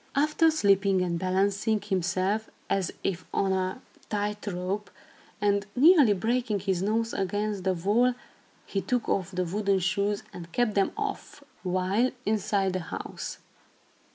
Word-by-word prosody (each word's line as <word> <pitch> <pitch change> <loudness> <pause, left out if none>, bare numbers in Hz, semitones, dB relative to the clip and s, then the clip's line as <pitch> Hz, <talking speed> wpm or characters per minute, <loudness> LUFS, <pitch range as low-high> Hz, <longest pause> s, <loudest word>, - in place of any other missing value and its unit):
After 305 +3 +4
slipping 200 -9 +3
and 170 -2 -1
balancing 200 +4 +1
himself, 190 +2 -1 0.2
as 190 -3 +1
if 185 -2 -1
on 195 -1 +1
a 185 +5 -2 0.3
tight 210 0 -2
rope, 190 +2 -3 0.5
and 200 0 +1
nearly 285 - +7
breaking 225 0 0
his 190 -2 0
nose 225 +3 0
against 205 0 -2
the 190 -1 +2
wall, 225 +8 +2 0.5
he 195 - -2
took 245 +2 -1
off 185 -2 0
the 185 -1 -2
wooden 200 +2 +1
shoes, 200 +2 0
and 170 -1 -9
kept 240 0 +1
them 195 -1 +2
off, 415 -8 -5 0.2
while 185 +6 +1 0.2
inside 200 -2 +1
the 185 - -1
house. 165 - -6
200 Hz, 140 wpm, -28 LUFS, 185-220 Hz, 0.5 s, nearly